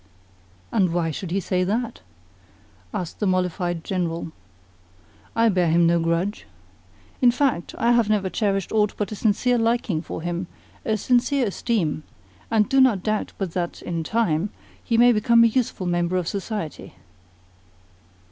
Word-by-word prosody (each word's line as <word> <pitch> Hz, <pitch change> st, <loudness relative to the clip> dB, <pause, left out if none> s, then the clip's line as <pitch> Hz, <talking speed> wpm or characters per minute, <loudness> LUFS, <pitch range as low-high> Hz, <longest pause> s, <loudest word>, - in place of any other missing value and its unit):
'" 90 Hz, 0 st, -32 dB
"And 185 Hz, -6 st, +3 dB
why 170 Hz, -2 st, 0 dB
should 175 Hz, +4 st, -5 dB
he 190 Hz, +3 st, 0 dB
say 185 Hz, 0 st, 0 dB
that?" 225 Hz, +5 st, -2 dB, 0.9 s
asked 175 Hz, -3 st, -5 dB
the 210 Hz, -, 0 dB
mollified 180 Hz, -2 st, -1 dB
General. 170 Hz, -3 st, -2 dB, 1.0 s
"I 230 Hz, 0 st, +4 dB
bear 180 Hz, -4 st, +2 dB
him 170 Hz, +1 st, +4 dB
no 170 Hz, 0 st, +3 dB
grudge. 170 Hz, +5 st, -1 dB, 0.7 s
In 250 Hz, -, +7 dB
fact, 245 Hz, -8 st, 0 dB
I 235 Hz, +1 st, +2 dB
have 235 Hz, -3 st, +3 dB
never 205 Hz, -3 st, +1 dB
cherished 195 Hz, -1 st, -1 dB
aught 210 Hz, -1 st, +1 dB
but 210 Hz, -1 st, -2 dB
a -, -, -3 dB
sincere 235 Hz, +4 st, +1 dB
liking 225 Hz, -7 st, 0 dB
for 160 Hz, -, -7 dB
him, 175 Hz, +1 st, -3 dB, 0.4 s
a 220 Hz, -1 st, 0 dB
sincere 250 Hz, +4 st, +2 dB
esteem, 195 Hz, -7 st, -1 dB, 0.5 s
and 215 Hz, -2 st, +3 dB
do 270 Hz, 0 st, +4 dB
not 225 Hz, -8 st, +3 dB
doubt 215 Hz, -1 st, -1 dB
but 190 Hz, -4 st, -3 dB
that, 175 Hz, 0 st, -4 dB
in 170 Hz, -2 st, -3 dB
time, 200 Hz, -3 st, 0 dB, 0.3 s
he 230 Hz, -, 0 dB
may 245 Hz, +1 st, +7 dB
become 230 Hz, +1 st, +4 dB
a -, -, +7 dB
useful 240 Hz, -7 st, -1 dB
member 175 Hz, +1 st, 0 dB
of 180 Hz, -2 st, -2 dB
society." 200 Hz, -4 st, -5 dB
195 Hz, 155 wpm, -23 LUFS, 175-230 Hz, 1.0 s, In